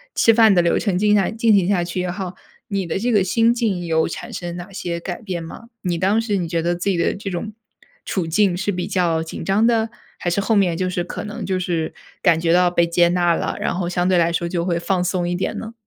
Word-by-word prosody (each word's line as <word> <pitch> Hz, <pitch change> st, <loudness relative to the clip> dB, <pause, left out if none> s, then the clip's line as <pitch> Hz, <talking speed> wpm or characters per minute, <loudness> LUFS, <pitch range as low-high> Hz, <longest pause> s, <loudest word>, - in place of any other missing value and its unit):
吃 225 Hz, -, +5 dB
饭 220 Hz, -2 st, +6 dB
的 175 Hz, -, +5 dB
流 170 Hz, -, +2 dB
程 195 Hz, -5 st, 0 dB
进 210 Hz, +1 st, +3 dB
下 200 Hz, -, +2 dB
进 225 Hz, 0 st, +2 dB
行 190 Hz, -3 st, +3 dB
下 190 Hz, -3 st, +2 dB
去 175 Hz, +1 st, -4 dB
也 180 Hz, -, -2 dB
好， 185 Hz, -1 st, -5 dB, 0.3 s
你 195 Hz, -4 st, -2 dB
的 170 Hz, +3 st, -2 dB
这 240 Hz, +3 st, 0 dB
个 205 Hz, -4 st, +4 dB
心 230 Hz, +5 st, +3 dB
境 210 Hz, -8 st, -1 dB
有 160 Hz, -1 st, +1 dB
产 -, -, -7 dB
生 175 Hz, -1 st, -5 dB
哪 180 Hz, +3 st, -8 dB
些 170 Hz, -2 st, -4 dB
改 175 Hz, +4 st, -6 dB
变 180 Hz, -5 st, -4 dB
吗？ 230 Hz, +8 st, -10 dB
你 175 Hz, -3 st, -1 dB
当 195 Hz, +5 st, +2 dB
时 210 Hz, -3 st, -1 dB
你 175 Hz, -2 st, -2 dB
觉 165 Hz, 0 st, -1 dB
得 175 Hz, +1 st, 0 dB
自 175 Hz, +3 st, -2 dB
己 185 Hz, -, +1 dB
的 170 Hz, -, +1 dB
这 200 Hz, 0 st, -5 dB
种 195 Hz, +4 st, -4 dB, 0.5 s
处 185 Hz, -4 st, -1 dB
境 185 Hz, +2 st, +2 dB
是 200 Hz, +2 st, -1 dB
比 180 Hz, -1 st, -3 dB
较 170 Hz, -3 st, +1 dB
紧 165 Hz, -, -7 dB
张 200 Hz, +3 st, +2 dB
的， 230 Hz, -1 st, +2 dB, 0.3 s
还 175 Hz, -, -2 dB
是 175 Hz, +4 st, 0 dB
后 220 Hz, +3 st, +1 dB
面 185 Hz, -4 st, +3 dB
就 185 Hz, +2 st, -1 dB
是 180 Hz, -1 st, -2 dB
可 -, -, -6 dB
能 210 Hz, 0 st, -6 dB
就 185 Hz, -1 st, -1 dB
是 170 Hz, -3 st, -2 dB, 0.3 s
感 170 Hz, -3 st, +4 dB
觉 165 Hz, 0 st, +1 dB
到 180 Hz, +1 st, +4 dB
被 170 Hz, -1 st, +3 dB
接 170 Hz, 0 st, +3 dB
纳 175 Hz, -1 st, +2 dB
了， -, -, -3 dB
然 -, -, -1 dB
后 175 Hz, -1 st, -2 dB
相 175 Hz, +1 st, 0 dB
对 185 Hz, -, +3 dB
来 170 Hz, 0 st, +2 dB
说 170 Hz, 0 st, -1 dB
就 170 Hz, -1 st, -1 dB
会 175 Hz, -2 st, 0 dB
放 180 Hz, +1 st, 0 dB
松 180 Hz, -1 st, -1 dB
一 175 Hz, -, -1 dB
点 185 Hz, -, -2 dB
呢？ 225 Hz, +1 st, -7 dB
180 Hz, 285 characters per minute, -21 LUFS, 175-200 Hz, 0.5 s, 饭